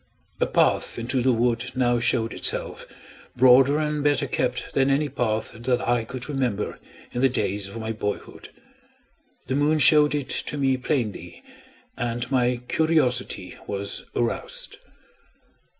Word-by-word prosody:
A - - +2
path - - +1
into 120 +2 -1
the 130 +1 +3
wood 120 +1 0
now 120 -2 +2
showed 115 -1 +1
itself, - - 0 0.5
broader 130 +3 +6
and 150 -1 -1
better 145 -2 +2
kept 125 -1 -2
than 135 0 +2
any 145 +2 +1
path 110 -5 -2
that 120 +2 -1
I 120 -2 0
could 125 +1 -7
remember 125 -8 -2 0.3
in 125 - -3
the 135 - +4
days 100 -5 -2
of 100 - -9
my 110 0 -4
boyhood. 105 -2 -5 1.0
The 130 - -3
moon 145 +3 +2
showed 150 0 +6
it 140 -3 -3
to 150 - -2
me 135 -2 +2
plainly, 110 - -3 0.5
and 120 +1 -3
my 125 -2 +1
curiosity 125 - 0
was 100 0 -4
aroused. 120 -1 -3
125 Hz, 140 wpm, -24 LUFS, 115-135 Hz, 1.0 s, broader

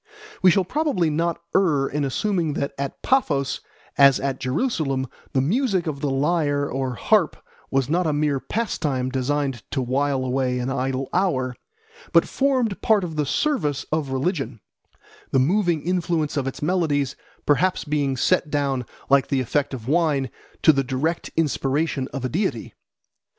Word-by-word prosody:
We 185 - +7
shall 190 +2 +4
probably 190 - 0
not 170 +2 0 0.2
err 150 -8 +3
in 145 +1 -2
assuming 165 +3 0
that 140 0 -2
at 140 -1 -4
Paphos 145 - +1 0.4
as 140 -1 +7
at 135 -1 -2
Jerusalem 135 - -1 0.3
the 130 - +3
music 195 - +1
of 145 -4 -4
the 145 - 0
lyre 145 0 +1
or 130 -2 -2
harp 210 - +2 0.3
was 135 -2 +1
not 170 +3 +1
a - - +2
mere 145 -2 +1
pastime 140 - -2
designed 135 -1 -1
to - - -2
while 130 +1 0
away 130 0 0
an 125 +1 -2
idle 135 0 -1
hour, 130 -10 +1 0.6
but - - +5
formed 255 -7 0
part 215 -3 +3
of 165 -3 -4
the 150 -2 0
service 150 - 0
of 155 -3 0
religion, 135 - -2 0.7
the - - +1
moving 170 +3 +2
influence 170 -4 0
of 140 -2 -1
its 135 - -5
melodies 150 -6 +1
being - - -31
perhaps 180 +6 +2 0.4
set - - +2
down, 140 -4 -1 0.2
like 140 -1 +4
the 135 - +1
effect 140 +3 0
of 125 -4 -7
wine, 150 -3 +1 0.3
to 155 - +7
the 135 -1 +1
direct 135 +6 -2
inspiration 145 -2 0
of 135 -2 -5
a - - -1
deity. 155 - -2
145 Hz, 160 wpm, -23 LUFS, 135-170 Hz, 0.7 s, We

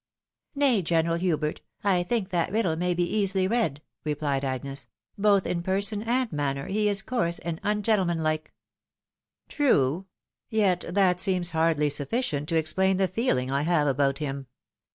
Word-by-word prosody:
" - - -65
Nay, 270 -7 +3
General 165 0 +1
Hubert, 155 -4 -1 0.2
I 190 -3 +3
think 195 +1 -1
that 175 -1 0
riddle 205 -6 +1
may 180 +1 0
be 175 - +1
easily 195 0 +1
read," 180 - 0 0.2
repUed 145 -2 -1
Agnes; 135 +1 -4
" - - -50
both 200 -2 +3
in 170 - -1
person 200 +3 0
and 240 +1 0
manner 140 -2 -2
he 210 +1 +1
is 200 0 0
coarse 175 -9 -1
and 170 -1 -5
ungentlemanlike." 180 -7 0 0.5
" - - -66
True! 185 - +1 0.4
yet 195 -5 +2
that 180 -1 +2
seems 180 -2 +1
hardly 160 -2 +2
suiRcient 145 - -2
to 165 - -1
explain 185 +4 +1
the 190 0 +2
feeling 175 - 0
I 140 +1 +1
have 155 -1 +2
about 135 0 +1
him. 140 -2 -4
175 Hz, 160 wpm, -26 LUFS, 150-200 Hz, 0.5 s, Nay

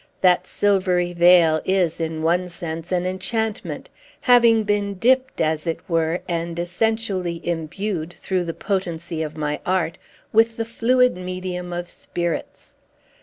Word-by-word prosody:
That 180 0 +4
silvery 185 -3 +1
veil 170 -2 +5
is, 185 -4 +1
in 160 -1 -3
one 180 +2 +1
sense, 165 0 -6
an 180 -1 +1
enchantment, 215 +4 -3 0.3
having 235 -3 +5
been 205 -1 0
dipped, 260 +6 +2
as 155 +1 0
it 165 - -1
were, 165 0 0
and 170 -1 -3
essentially 185 -1 -1
imbued, 170 +1 -3
through 185 0 -2
the 165 - -4
potency 170 -4 -3
of 155 0 -4
my 150 -1 -2
art, 180 -1 0 0.3
with 225 +1 +4
the 225 - -1
fluid 250 +2 +2
medium 180 0 -5
of 175 0 -4
spirits. 175 -1 -5
180 Hz, 135 wpm, -22 LUFS, 170-205 Hz, 0.3 s, veil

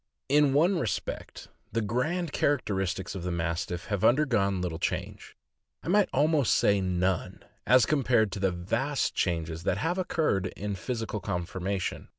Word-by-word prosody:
In 145 -1 +4
one 170 +6 +3
respect, 110 - -4 0.2
the 115 +2 0
grand 150 - -1
characteristics 95 -12 -1
of 95 - -5
the 90 - -3
Mastiff 85 +1 -2
have 100 -4 -2
undergone 115 -8 +3
little 85 -3 -3
change - - -4 0.2
— - - -43
I - - -5
might 205 +2 +4
almost 145 -2 +3
say 100 -1 +3
none 90 -1 -1
— - - -32
as 125 - +4
compared 120 -8 +2
with 100 - -5
the 95 - +3
vast 100 +11 -1
changes 80 -2 -1
that - - 0
have 175 +4 -1
occurred 155 - 0
in 105 0 -3
physical 115 +2 -4
conformation. 95 0 -3
105 Hz, 160 wpm, -28 LUFS, 90-140 Hz, 0.2 s, In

